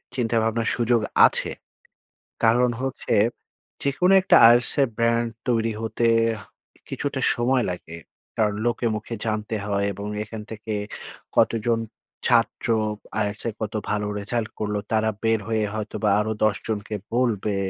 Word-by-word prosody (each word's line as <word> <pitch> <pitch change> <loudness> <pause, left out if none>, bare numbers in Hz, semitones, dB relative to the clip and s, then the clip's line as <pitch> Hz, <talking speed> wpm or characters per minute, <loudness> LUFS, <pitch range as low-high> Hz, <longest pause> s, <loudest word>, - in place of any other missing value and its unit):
চিন্তাভাবনার 115 -2 +1
সুযোগ 120 -1 +2 0.3
আছে। - - -2 0.9
কারণ 120 +2 +4
হচ্ছে 135 -1 -2 0.7
যেকোনো 160 +7 +2
একটা - - +5 0.2
IELTS 120 +1 +3
এর 135 - +3
ব্র্যান্ড 115 0 +2 0.2
তৈরি 115 -1 +1
হতে, 115 +1 0 0.8
কিছুটা - - -3
সময় 125 +1 +1
লাগে, 85 -2 -7 0.4
কারণ 105 -2 +1
লোকে 120 0 0
মুখে 110 +2 -5
জানতে 110 0 -2
হয় 100 0 0
এবং 100 +2 -6 0.2
এখান 110 0 -8
থেকে 110 0 -5 0.6
কতজন, 115 0 +2 0.5
ছাত্র 120 0 +2 0.6
IELTS 105 +1 -4
এ - - 0
কত 110 0 -4 0.2
ভালো 105 0 0
রেজাল্ট 110 +2 -2
করল 105 -1 -2 0.2
তারা 110 0 +2
বের 115 -1 +2
হয়ে 110 -1 +1
হয়তো 110 0 -4
বা 105 - +4
আরও 110 +1 -1
১০ 110 -1 +3
জনকে 105 0 -3 0.2
বলবে, 110 -5 +1
110 Hz, 135 wpm, -24 LUFS, 105-120 Hz, 0.9 s, একটা